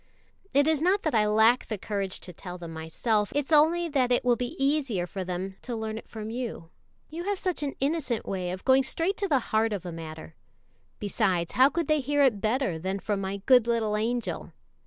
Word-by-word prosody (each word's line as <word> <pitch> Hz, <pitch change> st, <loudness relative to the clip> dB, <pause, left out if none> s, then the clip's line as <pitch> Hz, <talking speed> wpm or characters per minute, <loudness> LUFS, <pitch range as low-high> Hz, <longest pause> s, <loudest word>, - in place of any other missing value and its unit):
It 285 Hz, +2 st, +3 dB
is 315 Hz, -2 st, +2 dB
not 380 Hz, +4 st, +2 dB
that 315 Hz, -, 0 dB
I 215 Hz, -2 st, +3 dB
lack 220 Hz, +4 st, +4 dB
the 215 Hz, -, -3 dB
courage 200 Hz, -1 st, -3 dB
to 180 Hz, -, -9 dB
tell 180 Hz, +1 st, -8 dB
them 170 Hz, -2 st, -8 dB
myself, 205 Hz, +7 st, -1 dB
it's 290 Hz, +1 st, -1 dB
only 325 Hz, +3 st, +4 dB
that 260 Hz, -4 st, +1 dB
it 245 Hz, -, +2 dB
will 245 Hz, -1 st, +4 dB
be 245 Hz, +1 st, -4 dB
easier 270 Hz, -9 st, +1 dB
for 190 Hz, +2 st, -5 dB
them 185 Hz, +1 st, -4 dB
to 245 Hz, -, -5 dB
learn 220 Hz, 0 st, -4 dB
it -, -, -16 dB
from 220 Hz, -1 st, -7 dB
you, 230 Hz, -9 st, -5 dB, 0.4 s
you 340 Hz, +3 st, -5 dB
have 405 Hz, 0 st, 0 dB
such 365 Hz, -3 st, -2 dB
an 285 Hz, -2 st, -3 dB
innocent 275 Hz, -5 st, -1 dB
way 185 Hz, -2 st, -3 dB
of 185 Hz, +1 st, -6 dB
going 265 Hz, 0 st, +6 dB
straight 330 Hz, +8 st, 0 dB
to 400 Hz, -, -1 dB
the 290 Hz, -, +3 dB, 0.2 s
heart 220 Hz, 0 st, +3 dB
of 195 Hz, -3 st, -4 dB
a 175 Hz, -, -4 dB
matter. 160 Hz, -1 st, -8 dB, 0.6 s
Besides, 190 Hz, -5 st, 0 dB
how 260 Hz, +2 st, +5 dB
could 335 Hz, +2 st, -2 dB
they 305 Hz, -1 st, +3 dB
hear 290 Hz, +1 st, +2 dB
it 230 Hz, -7 st, +3 dB
better 220 Hz, -7 st, 0 dB
than 190 Hz, +4 st, -2 dB
from 200 Hz, 0 st, -2 dB
my 195 Hz, 0 st, -4 dB
good 250 Hz, -3 st, +6 dB
little 225 Hz, -3 st, +1 dB
angel?" 230 Hz, +2 st, -2 dB
225 Hz, 220 wpm, -27 LUFS, 195-280 Hz, 0.6 s, going